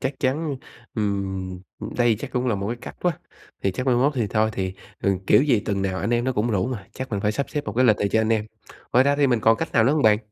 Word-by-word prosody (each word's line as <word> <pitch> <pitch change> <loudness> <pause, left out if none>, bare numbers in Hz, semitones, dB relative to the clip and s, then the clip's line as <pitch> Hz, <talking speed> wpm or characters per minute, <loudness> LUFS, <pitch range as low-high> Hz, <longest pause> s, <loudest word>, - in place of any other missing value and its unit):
chắc 130 +1 -2
chắn 140 +2 0 0.4
ừm, 95 -3 -2 0.2
ừm, - - -6
đây 120 -2 +3
chắc - - -6
cũng 125 0 0
là 115 - +2
một 100 0 -3
cái 120 - -2
cách - - -9
quá, 175 -3 0 0.4
thì 95 - +1
chắc 125 +7 -4
mai 125 - +4
mốt 140 +4 +3
thì 115 -5 0
thôi, 110 +1 +1
thì, 95 -2 -2 0.3
ừ, 100 -1 +2
kiểu 135 - +6
gì 130 -8 +3
tuần 100 -2 -2
nào 95 -1 -1
anh 105 - -1
em 120 0 +1
nó 130 - +1
cũng 115 0 0
rủ 100 0 +1
mà, 115 -7 -5
chắc 130 -1 -6
mình 100 -2 -1
phải 105 +1 +1
sắp 140 +6 -3
xếp 145 -1 -3
một - - -4
cái 130 +2 +3
lịch 110 -4 +5
này 100 - 0
cho 110 - +2
anh 110 - 0
em. 110 -1 0 0.5
Ngoài 125 +2 +5
ra 140 0 +3
thì 145 -1 +4
mình 120 -4 +2
còn 115 +1 +4
cách - - -4
nào 110 - +4
nữa 135 - +4
hông 155 - +1
bạn? 105 -1 +5
115 Hz, 300 wpm, -24 LUFS, 100-130 Hz, 0.5 s, kiểu